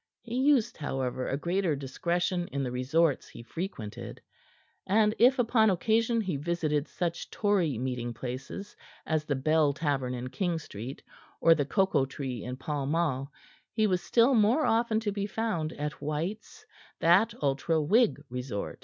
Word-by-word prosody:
He 235 Hz, -1 st, -8 dB
used, 260 Hz, -3 st, +3 dB
however, 130 Hz, -3 st, -2 dB
a 135 Hz, -, -1 dB
greater 175 Hz, +1 st, 0 dB
discretion 175 Hz, +6 st, -1 dB
in 140 Hz, 0 st, -3 dB
the 125 Hz, -, -2 dB
resorts 140 Hz, +5 st, +1 dB
he -, -, -11 dB
frequented. 125 Hz, -, -6 dB, 0.7 s
And 210 Hz, +2 st, +4 dB
if 255 Hz, +3 st, +6 dB
upon 230 Hz, -3 st, +4 dB
occasion 225 Hz, +4 st, +2 dB
he 185 Hz, -8 st, -2 dB
visited 155 Hz, -1 st, -1 dB
such 170 Hz, -1 st, -3 dB
Tory 190 Hz, -, +1 dB
meeting 125 Hz, -1 st, -3 dB
places 130 Hz, -, -6 dB, 0.3 s
as 155 Hz, -1 st, 0 dB
the 145 Hz, -, 0 dB
Bell 150 Hz, +2 st, +2 dB
Tavern 135 Hz, -4 st, -1 dB
in 125 Hz, +1 st, -5 dB
King 175 Hz, +4 st, -1 dB
Street 130 Hz, -3 st, -8 dB, 0.4 s
or 165 Hz, -, +6 dB
the 145 Hz, -3 st, 0 dB
Cocoa 190 Hz, -5 st, +2 dB
Tree 130 Hz, -4 st, -5 dB
in 125 Hz, +1 st, -5 dB
Pall 140 Hz, 0 st, -3 dB
Mall, 145 Hz, -3 st, 0 dB, 0.4 s
he 220 Hz, -1 st, +2 dB
was 185 Hz, -3 st, +1 dB
still 240 Hz, +3 st, +4 dB
more 235 Hz, +6 st, +4 dB
often 225 Hz, -1 st, +2 dB
to 210 Hz, -2 st, -1 dB
be 200 Hz, 0 st, -2 dB
found 205 Hz, -8 st, -2 dB
at 150 Hz, +1 st, -5 dB
White's, 165 Hz, +9 st, -4 dB, 0.3 s
that 185 Hz, +7 st, +4 dB
ultra 145 Hz, +3 st, +1 dB
Whig 195 Hz, +1 st, +3 dB
resort. 125 Hz, -4 st, -5 dB
160 Hz, 155 wpm, -29 LUFS, 135-205 Hz, 0.7 s, if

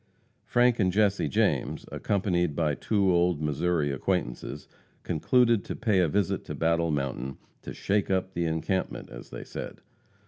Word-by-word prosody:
Frank 120 Hz, -1 st, +3 dB
and 95 Hz, -3 st, +3 dB
Jesse 100 Hz, -3 st, +2 dB
James, 70 Hz, -, 0 dB
accompanied 90 Hz, -6 st, 0 dB
by 75 Hz, -2 st, +1 dB
two 100 Hz, +2 st, +1 dB
old 85 Hz, -2 st, +2 dB
Missouri 75 Hz, 0 st, 0 dB
acquaintances, 70 Hz, -2 st, -2 dB, 0.4 s
concluded 115 Hz, +6 st, +3 dB
to -, -, -4 dB
pay 105 Hz, -4 st, +2 dB
a 90 Hz, -, +4 dB
visit 100 Hz, +3 st, 0 dB
to -, -, -5 dB
Battle 85 Hz, 0 st, +1 dB
Mountain, 65 Hz, -3 st, -2 dB, 0.2 s
"to -, -, -7 dB
shake 100 Hz, 0 st, 0 dB
up 95 Hz, 0 st, 0 dB
the 85 Hz, 0 st, -1 dB
encampment," 80 Hz, +4 st, -2 dB
as -, -, -10 dB
they -, -, -7 dB
said. -, -, -7 dB
90 Hz, 150 wpm, -28 LUFS, 75-100 Hz, 0.4 s, a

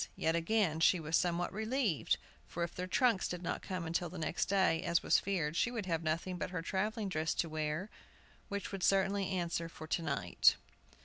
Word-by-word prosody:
Yet, 160 Hz, +1 st, +1 dB
again, 170 Hz, -1 st, +1 dB
she 170 Hz, +2 st, +5 dB
was 160 Hz, 0 st, -1 dB
somewhat 175 Hz, +1 st, +1 dB
relieved, 220 Hz, -, 0 dB, 0.3 s
for 170 Hz, -, -3 dB
if 170 Hz, -, -3 dB
their 180 Hz, 0 st, -4 dB
trunks 230 Hz, -1 st, +2 dB
did 180 Hz, 0 st, -5 dB
not -, -, -2 dB
come 180 Hz, -4 st, -4 dB
till 175 Hz, 0 st, 0 dB
the 180 Hz, -, -8 dB
next 160 Hz, +1 st, -1 dB
day, 185 Hz, -4 st, +2 dB
as 170 Hz, -1 st, +1 dB
was -, -, +4 dB
feared, 165 Hz, -6 st, -1 dB
she 235 Hz, -, +2 dB
should 230 Hz, -5 st, -4 dB
have 165 Hz, -3 st, 0 dB
nothing 165 Hz, +3 st, -2 dB
but -, -, -2 dB
her 180 Hz, -2 st, -4 dB
travelling 210 Hz, +4 st, -1 dB
dress 160 Hz, -3 st, -1 dB
to 170 Hz, -, 0 dB
wear, 155 Hz, +3 st, -2 dB, 0.6 s
which 200 Hz, -1 st, -4 dB
would 195 Hz, -2 st, -5 dB
certainly 195 Hz, +1 st, +2 dB
answer 170 Hz, -3 st, -2 dB
for 155 Hz, -, -9 dB
to 160 Hz, +2 st, -1 dB
night. 140 Hz, -, +3 dB
175 Hz, 200 wpm, -34 LUFS, 165-195 Hz, 0.6 s, she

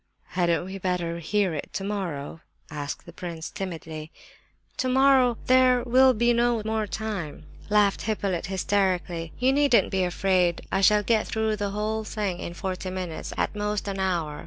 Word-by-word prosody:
"Hadn't 175 Hz, -1 st, +1 dB
we 190 Hz, +1 st, -7 dB
better 175 Hz, -2 st, -2 dB
hear 190 Hz, +2 st, 0 dB
it 150 Hz, -, -5 dB
tomorrow?" 180 Hz, -7 st, -4 dB, 0.3 s
asked 145 Hz, -2 st, -5 dB
the 170 Hz, -, -12 dB
prince 170 Hz, -2 st, -6 dB
timidly. 160 Hz, -4 st, -6 dB, 0.6 s
"Tomorrow 260 Hz, -2 st, +4 dB
'there 255 Hz, -1 st, +5 dB
will 260 Hz, +1 st, +5 dB
be 235 Hz, +2 st, +3 dB
no 235 Hz, -2 st, +2 dB
more 220 Hz, -1 st, -1 dB
time!'" 195 Hz, -9 st, -5 dB, 0.2 s
laughed 205 Hz, -1 st, +3 dB
Hippolyte, 200 Hz, -5 st, -2 dB
hysterically. 185 Hz, -3 st, 0 dB
"You 255 Hz, +2 st, +3 dB
needn't 285 Hz, -4 st, +3 dB
be 190 Hz, -1 st, +1 dB
afraid; 180 Hz, -1 st, +1 dB
I 195 Hz, -, +1 dB
shall 210 Hz, +2 st, +5 dB
get 220 Hz, +1 st, +1 dB
through 220 Hz, -1 st, 0 dB
the 205 Hz, 0 st, -2 dB
whole 215 Hz, +2 st, -2 dB
thing 205 Hz, -4 st, -3 dB
in 170 Hz, -, -6 dB
forty 185 Hz, 0 st, -4 dB
minutes, 180 Hz, -3 st, -5 dB
at -, -, -1 dB
most 210 Hz, 0 st, -2 dB
an 195 Hz, -1 st, -3 dB
hour! 170 Hz, -6 st, -1 dB
195 Hz, 160 wpm, -26 LUFS, 175-220 Hz, 0.6 s, there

